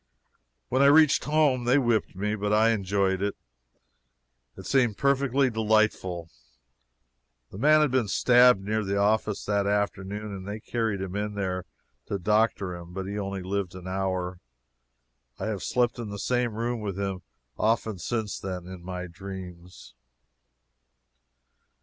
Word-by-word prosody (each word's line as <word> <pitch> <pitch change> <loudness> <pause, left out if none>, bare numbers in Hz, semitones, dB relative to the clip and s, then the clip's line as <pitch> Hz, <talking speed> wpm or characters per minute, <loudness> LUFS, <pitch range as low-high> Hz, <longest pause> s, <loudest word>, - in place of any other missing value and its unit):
When 130 +2 +2
I 140 - +7
reached 155 0 +5
home, 150 -5 +2
they 125 +3 +4
whipped 120 -8 +1
me, 105 +3 -1
but 105 -1 -2
I 110 +2 +4
enjoyed 100 -2 0
it. 100 0 -1 1.2
It - - -10
seemed 120 -6 +2
perfectly 140 -1 +2
delightful. 110 -6 +1 1.2
That 95 - -9
man 155 +4 +5
had 150 -4 +2
been 130 -4 +1
stabbed 125 0 +5
near 110 +2 -1
the 100 0 -1
office 105 0 +1
that 100 -1 +1
afternoon, 105 0 -2
and 95 0 -8
they 105 +2 -5
carried 110 -3 -2
him 95 0 -5
in 105 0 -3
there 95 -2 -2 0.4
to 100 - -2
doctor 105 -1 +1
him, 85 0 -10
but 95 0 -4
he 100 +2 -4
only 100 -1 -4
lived 95 -1 -3
an 90 0 -9
hour. 95 -1 -2 1.0
I - - -4
have 105 -4 -3
slept 120 -1 0
in 115 -3 -5
the 100 - -6
same 120 0 0
room 120 +1 -2
with 100 -3 -4
him 95 -2 -3 0.4
often 110 -2 0
since 110 +3 -3
then 90 -2 -5
in 90 -1 -9
my 90 0 -5
dreams. 90 -1 -10
105 Hz, 150 wpm, -27 LUFS, 95-115 Hz, 1.2 s, I